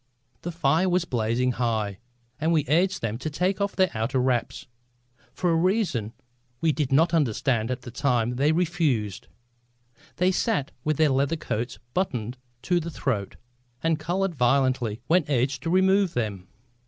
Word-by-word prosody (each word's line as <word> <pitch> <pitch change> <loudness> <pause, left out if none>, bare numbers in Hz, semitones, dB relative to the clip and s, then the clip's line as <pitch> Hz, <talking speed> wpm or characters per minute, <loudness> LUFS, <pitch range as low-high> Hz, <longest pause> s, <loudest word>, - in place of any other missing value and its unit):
The 175 - -4
fire 165 +3 +2
was 180 -1 +1
blazing 120 -1 0
high 110 -5 -1 0.4
and 160 +2 +1
we 155 -4 +2
urged 180 +5 +2
them 115 0 -2
to 155 - -3
take 185 +6 -1
off 200 0 -1
their 185 -2 +3
outer 115 +4 -1
wraps. 125 -2 0 0.7
For 180 -2 0
a - - +3
reason 180 - +1
which 110 - -10 0.5
we 160 - +2
did 145 -3 -2
not 165 +5 +4
understand 125 -5 +1
at 130 0 -3
the 120 - -8
time 125 -2 0
they 145 +3 +3
refused. 155 - 0 0.9
They 180 +1 +2
sat 190 - 0
with 155 -2 0
their 155 -1 +4
leather 140 +4 +1
coats 120 -5 -3 0.2
buttoned 125 - -2 0.2
to 175 -1 +2
the 170 0 -5
throat, 120 - -2 0.5
and 165 -1 +1
coloured 180 +4 -1
violently 125 -4 +1
when 170 +5 +3
urged 135 0 +1
to 165 - -3
remove 190 +1 +3
them. 100 -6 -3
140 Hz, 165 wpm, -25 LUFS, 120-170 Hz, 0.9 s, not